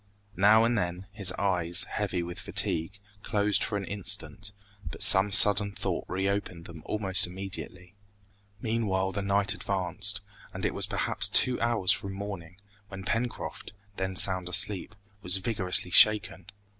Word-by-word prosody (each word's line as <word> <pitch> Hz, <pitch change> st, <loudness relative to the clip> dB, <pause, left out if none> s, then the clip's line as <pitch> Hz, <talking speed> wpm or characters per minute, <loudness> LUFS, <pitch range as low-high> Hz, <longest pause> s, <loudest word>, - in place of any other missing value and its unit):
Now 105 Hz, +3 st, +4 dB
and 120 Hz, +1 st, 0 dB
then, 90 Hz, -2 st, -4 dB
his 100 Hz, -3 st, +2 dB
eyes, 90 Hz, -3 st, 0 dB
heavy 95 Hz, -4 st, -4 dB
with 85 Hz, 0 st, -8 dB
fatigue, 80 Hz, +5 st, 0 dB, 0.2 s
closed 105 Hz, 0 st, -1 dB
for 105 Hz, -, -3 dB
an 100 Hz, -, -6 dB
instant, 100 Hz, -1 st, -5 dB, 0.4 s
but -, -, -5 dB
some 95 Hz, +2 st, +7 dB
sudden 100 Hz, 0 st, +6 dB
thought 95 Hz, -3 st, -5 dB
reopened 95 Hz, -2 st, -4 dB
them 85 Hz, -2 st, -12 dB
almost 95 Hz, -4 st, +1 dB
immediately. 90 Hz, -1 st, -9 dB, 0.7 s
Meanwhile 105 Hz, -4 st, -2 dB
the 100 Hz, -, -5 dB
night 100 Hz, 0 st, 0 dB
advanced, 95 Hz, +1 st, -3 dB, 0.3 s
and -, -, -5 dB
it -, -, -2 dB
was -, -, -1 dB
perhaps -, -, 0 dB
two 125 Hz, -1 st, +3 dB
hours 115 Hz, -6 st, +3 dB
from 95 Hz, +3 st, -1 dB
morning, 95 Hz, -3 st, -9 dB, 0.3 s
when 95 Hz, -1 st, -10 dB
Pencroft, 115 Hz, 0 st, -5 dB, 0.2 s
then 95 Hz, 0 st, -4 dB
sound 90 Hz, 0 st, +2 dB
asleep, 95 Hz, +3 st, 0 dB, 0.3 s
was 90 Hz, 0 st, +4 dB
vigorously 95 Hz, -3 st, -1 dB
shaken. 105 Hz, -3 st, +3 dB
95 Hz, 145 wpm, -26 LUFS, 90-105 Hz, 0.7 s, some